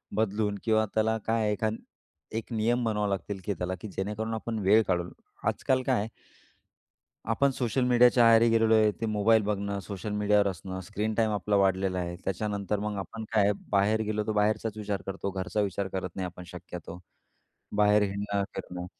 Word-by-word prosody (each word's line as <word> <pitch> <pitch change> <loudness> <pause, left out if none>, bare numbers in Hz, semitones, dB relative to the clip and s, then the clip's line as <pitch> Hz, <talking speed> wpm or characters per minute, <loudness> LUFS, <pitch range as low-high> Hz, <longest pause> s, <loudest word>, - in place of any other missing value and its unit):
बदलून 105 -1 0
किंवा 110 -1 +3
त्याला 110 +1 +2
काय 115 0 +2
आहे 105 - +1
एखान 110 +1 -1 0.6
एक 115 - -6
नियम 120 +2 +1
बनवावे 105 -2 0
लागतील 100 0 -3
की 100 - 0
चला 90 +2 -3
की 110 - -6
जेणेकरून 105 +4 -3
आपण 110 0 -3
वेळ 105 +3 +5
काढून 90 -1 0 0.4
आजकाल 130 -1 +1
काय 130 -4 +2
आहे? 105 - -2 1.2
आपण 140 +5 +3
सोशल 125 -1 0
मीडियाच्या 125 -1 +5
आहारी 115 0 +6
गेलेलो 115 0 +4
आहे. 110 -1 +5
ते 115 - 0
मोबाईल 110 +1 +3
बघणं 100 -1 -2
सोशल 100 +1 -6
मीडियावर 105 0 +3
असणं, 95 +1 -5
स्क्रीन 105 +3 -3
टाईम 110 0 +2
आपला 105 0 0
वाढलेला 95 -1 +2
आहे. 85 -1 -3
त्याच्यानंतर 100 +1 -2
मग 105 0 -3
आपण 110 +4 -6
काय 110 -2 +4
आहे? 100 - +4 0.2
बाहेर 105 +2 +3
गेलो 105 0 -1
तर 110 - 0
बाहेरचाच 105 +1 0
विचार 100 -2 -3
करतो 95 0 -3
घरचा 95 +2 -2
विचार 100 -1 -1
करत 95 -1 -2
नाही 95 -1 -2
आपण 90 0 -9
शक्यतो, 90 -1 -9 0.8
बाहेर 105 0 +5
हिडणं, 100 0 -1
फिरणं. 90 0 -6
105 Hz, 180 wpm, -28 LUFS, 95-110 Hz, 1.2 s, आहारी